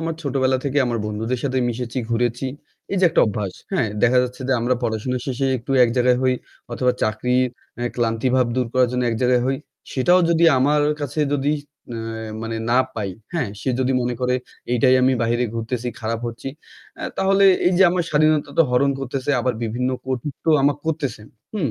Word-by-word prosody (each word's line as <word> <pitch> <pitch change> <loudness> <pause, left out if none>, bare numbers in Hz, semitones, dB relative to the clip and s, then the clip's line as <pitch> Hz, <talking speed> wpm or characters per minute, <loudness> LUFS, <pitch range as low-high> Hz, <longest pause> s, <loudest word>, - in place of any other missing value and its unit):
আমার 165 0 -2
ছোটবেলা 130 -2 +1
থেকে 140 +1 +1
আমার 120 -1 -1
বন্ধুদের 110 +4 -2
সাথে 130 -1 0
মিশেছি, 120 +1 -3
ঘুরেছি। 120 +2 0 0.5
এইযে 190 -1 +2
একটা - - +3
অভ্যাস, 100 -2 -3 0.2
হ্যাঁ? 150 - +1
দেখা 125 +1 +5
যাচ্ছে 125 +1 -5
যে - - +3
আমরা 120 +2 +1
পড়াশুনো 115 +2 -1
শেষে 135 +1 -1
একটু 120 +3 -10
এক - - +1
জায়গায় 125 0 +3
হই 130 -1 +3 0.4
অথবা 125 +1 +1
চাকরির 125 +4 +1 0.3
অ্যা 120 - -2
ক্লান্তিভাব 120 +2 +1
দূর 125 - +1
করার 130 -1 +3
জন্য 125 - 0
এক 115 - -1
জায়গায় 125 -1 +3
হই। 135 0 +1 0.4
সেটাও 175 +8 +4
যদি 170 0 +3
আমার 145 +3 +3 0.2
কাছে 145 +1 -2
যদি 145 +1 +1 0.4
অ্যা 115 -1 -5
মানে 115 0 -3
না 125 - +4 0.2
পাই, 100 -3 -3 0.2
হ্যাঁ? 145 -11 0
সে 130 - -3
যদি 130 +1 +1
মনে 120 0 -1
করে, 125 0 +1 0.4
"এইটাই 125 +1 +4
আমি 130 +1 +4
বাহিরে 120 +2 +1
ঘুরতেছি, 115 +2 -3
খারাপ 115 +1 -2
হচ্ছি" 120 +3 -6 0.5
অ্যা - - -6
তাহলে 195 +1 +3 0.2
এইযে 185 +1 +4
আমার 180 -1 0
স্বাধীনতা 155 -1 +2
তো 165 - +9
হরণ 140 +3 +3
করতেছে, 135 +1 -3
আবার 125 -1 0
বিভিন্ন 125 +3 -1 0.2
কটুক্তিও 130 +4 -1
আমাকে 145 0 +3
করতেছে। 145 -9 -2 0.3
হুম? 145 - 0
125 Hz, 180 wpm, -21 LUFS, 115-140 Hz, 0.5 s, তো